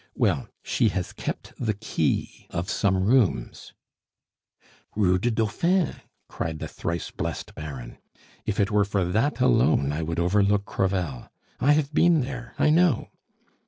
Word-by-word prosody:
Well, - - +1 0.2
she 115 - +2
has 90 -2 -3
kept - - -5
the 110 -4 0
key 100 -7 -2
of 90 +4 -3
some 95 -2 +1
rooms 115 -1 +1 0.6
" - - -34
"Rue 90 -3 +3
du 120 - +1
Dauphin!" 155 - +1 0.3
cried 80 -1 -4
the - - -5
thrice 85 -1 -4
blest - - -4
Baron. 70 -5 -8 0.4
"If 105 - -2
it 100 +2 +2
were 105 0 +4
for 100 -2 0
that 115 +8 0
alone, 70 - +3
I 80 - -2
would 80 +1 -3
overlook 100 +3 +2
Crevel. 90 -12 -2 0.3
I 140 +4 +4
have 150 -1 0
been 170 0 +4
there; 125 -2 -6
I 150 - +4
know." 165 -5 +3
105 Hz, 150 wpm, -25 LUFS, 90-125 Hz, 0.6 s, were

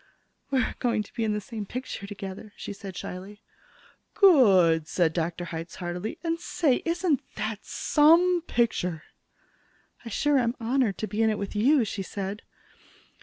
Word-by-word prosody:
"We're 265 -2 +1
going 235 -4 +1
to - - -18
be 230 - -2
in 215 -1 +1
the 210 - -1
same 210 0 -7
picture 250 -5 -6
together," 200 0 -8
she - - -6
said 195 -2 -9
shyly. 195 +3 -8 0.7
"Good!" 190 - +5
said 165 -2 +1
Dr. 175 +1 -2
Hitz 165 0 -6
heartily. 180 - -4
"And, 330 0 -1
say, 305 -6 +1
isn't 335 -4 +1
that 215 -1 -4
some 340 +4 +4
picture?" 180 -9 0 1.0
"I 235 - -7
sure 290 +5 +2
am 235 0 0
honored 235 -3 +1
to 215 - -3
be 215 +1 -2
in 220 - +4
it 215 - 0
with 200 +1 -5
you," 250 +4 +4
she 200 -1 -4
said. 195 +2 -5
215 Hz, 160 wpm, -27 LUFS, 190-260 Hz, 1.0 s, Good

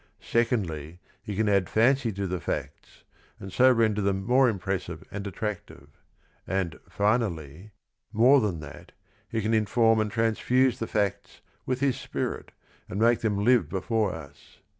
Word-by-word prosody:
Secondly, 90 - -1 0.2
he 105 - -6
can 110 +2 +1
add 100 -4 +2
fancy 120 +2 +3
to 100 0 -4
the 90 -1 -3
facts - - -6 0.4
and 95 -1 -9
so 130 +1 +6
render 110 -3 +2
them 95 -1 -1
more 125 +2 +4
impressive 95 -3 -4
and 100 0 -5
attractive. 100 -8 -6 0.6
And, 95 -3 -2
finally, 100 - -1 0.4
more 125 +5 +5
than 95 -7 -2
that, 75 -1 -12 0.4
he 110 -2 -2
can 110 +2 0
inform 110 +1 +3
and 110 -1 0
transfuse 120 +2 +1
the 115 - -3
facts 100 -3 -2 0.3
with 130 0 -1
his 135 -3 +1
spirit - - -4 0.4
and 100 - -4
make 115 +1 +4
them 105 -2 -1
live 120 - +4
before 100 +3 0
us. 70 -4 -12
105 Hz, 150 wpm, -27 LUFS, 95-115 Hz, 0.6 s, so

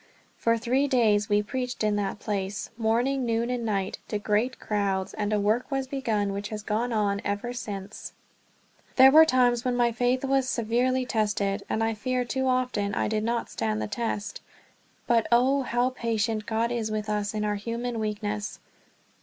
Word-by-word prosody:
For 230 0 +1
three 255 +5 +1
days 215 -6 +2
we 205 0 +3
preached 250 +3 -3
in 210 -1 +2
that 200 -1 -2
place 200 -2 -3
morning, 240 +4 +1
noon, 235 +1 0
and 245 -1 -2
night 200 -4 -2
to 210 - -2
great 215 +5 0
crowds; 195 -3 -1
and 210 0 -2
a 210 - +2
work 215 +5 +1
was 270 -1 -1
begun 225 -7 -1
which 200 +1 -4
has 210 -1 -5
gone 225 +4 -1
on 205 -2 0
ever 205 +4 -2
since. 205 -4 -7 0.8
There 265 0 +8
were 315 +2 +9
times 245 -3 +3
when 250 -1 0
my 240 -1 +3
faith 245 +3 0
was 270 -1 +1
severely 250 +2 +1
tested, 210 -3 0
and 220 - 0
I 225 0 +1
fear 250 +3 -1
too 265 +2 -1
often 250 -6 0
I - - 0
did 215 0 -1
not 235 +1 -1
stand 110 -1 -1
the 110 - -2
test; 210 - -3 0.6
but 230 -2 +2
oh, 260 +4 +4
how 245 0 0
patient 225 -3 -1
God 230 +1 0
is 230 -2 -1
with 215 0 -3
us 210 0 -1
in 210 0 -1
our 210 - 0
human 230 +3 -3
weakness. 210 -1 -3
225 Hz, 180 wpm, -27 LUFS, 210-245 Hz, 0.8 s, were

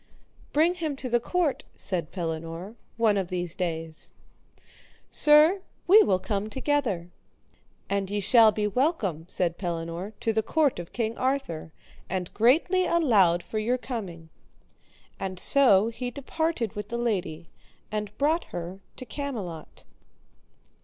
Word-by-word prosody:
Bring 320 +4 +3
him 320 -5 -3
to 260 -1 -5
the 240 0 +3
court, 335 +3 0
said 170 -5 -2
Pellinore, 165 +2 -5 0.2
one 220 -3 +3
of 190 -2 -1
these 175 -2 -3
days. 165 -3 -5 1.0
Sir, 305 +6 +6 0.2
we 410 +5 +8
will 190 - +3
come 205 +2 -3
together. 235 - -1 0.8
And 200 -1 -1
ye 205 +1 -1
shall 220 +3 +6
be 210 0 -1
welcome, 210 - 0
said 175 -2 -1
Pellinore, 170 +2 -4
to 225 - 0
the 220 - +2
court 285 - +1
of 175 - -8
King 230 -1 -2
Arthur, 255 - -2 0.4
and 180 -1 -3
greatly 330 - +3
allowed 205 - +3
for 215 - -3
your 240 +4 +1
coming. 190 -11 -6 0.9
And 190 -1 -4
so 225 -3 +5
he 245 +2 -4
departed 280 - -2
with 210 - -6
the 235 - -3
lady, 175 -9 -2 0.4
and 210 0 -4
brought 310 +4 +1
her 175 +2 -6 0.2
to 255 - -8
Camelot. 215 - -6
215 Hz, 135 wpm, -27 LUFS, 175-270 Hz, 1.0 s, we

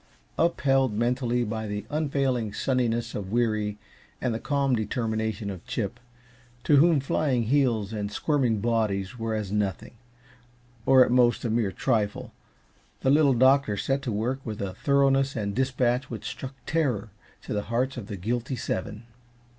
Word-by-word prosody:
Upheld 135 -7 +2
mentally 120 +2 0
by 110 -1 -3
the 105 0 -4
unfailing 135 -7 0
sunniness 120 -1 0
of 100 -2 -5
Weary 110 -3 0 0.4
and 125 -3 -1
the 110 - -3
calm 140 -2 +1
determination 110 -2 -2
of 95 -3 -9
Chip, 115 +1 -3 0.6
to 145 - +4
whom 160 +1 +5
flying 135 -2 0
heels 115 -4 +1
and 105 -1 -3
squirming 125 -3 +1
bodies 110 -1 -1
were 115 -1 -2
as 105 -3 -3
nothing, 105 +2 -2 0.9
or 130 -1 +7
at - - -2
most 120 -1 +3
a 115 - 0
mere 110 -4 +1
trifle, 105 -3 -1 0.7
the 135 - +3
Little 145 -2 +5
Doctor 130 -3 +4
set 135 +6 0
to 125 - -3
work 115 +6 -1
with 110 -3 -5
a 100 -2 -3
thoroughness 135 +2 +2
and 100 -3 -2
dispatch 130 0 0
which 110 -3 -7
struck 135 0 -6
terror 125 -11 0 0.3
to - - -5
the 105 - 0
hearts 125 +3 0
of 115 -5 -7
the 100 - -5
guilty 120 +7 -2
seven. 105 -1 -4
120 Hz, 155 wpm, -26 LUFS, 105-135 Hz, 0.9 s, or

